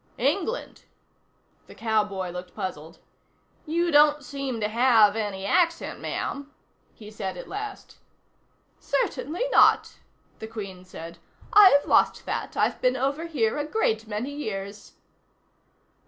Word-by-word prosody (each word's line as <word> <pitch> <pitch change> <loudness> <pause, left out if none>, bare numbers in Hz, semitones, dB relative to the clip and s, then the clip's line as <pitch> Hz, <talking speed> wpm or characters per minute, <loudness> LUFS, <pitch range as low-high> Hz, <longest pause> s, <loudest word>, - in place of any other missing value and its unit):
"England?" 340 - -2 0.8
The - - -14
cowboy 210 -5 -1
looked 180 0 -8
puzzled. 165 -5 -6 0.7
"You 340 +2 0
don't 295 0 +5
seem 270 -2 -4
to 210 - 0
have 225 -2 +4
any 205 -3 -3
accent, 335 - +1
ma'am," 285 0 -4 0.4
he 210 -1 -13
said 190 -4 -5
at - - -8
last. 410 +1 -7 0.8
"Certainly 355 -5 -2
not," - - +4 0.4
the 220 - -6
Queen 200 -5 -8
said. 170 -2 -10 0.3
"I've 380 -9 +7
lost - - +2
that; - - -4
I've - - +1
been 255 +1 +2
over 280 +6 -1
here 255 -6 0
a - - 0
great 225 - -1
many 220 +6 -4
years." 205 -7 -6
230 Hz, 125 wpm, -25 LUFS, 205-295 Hz, 0.8 s, I've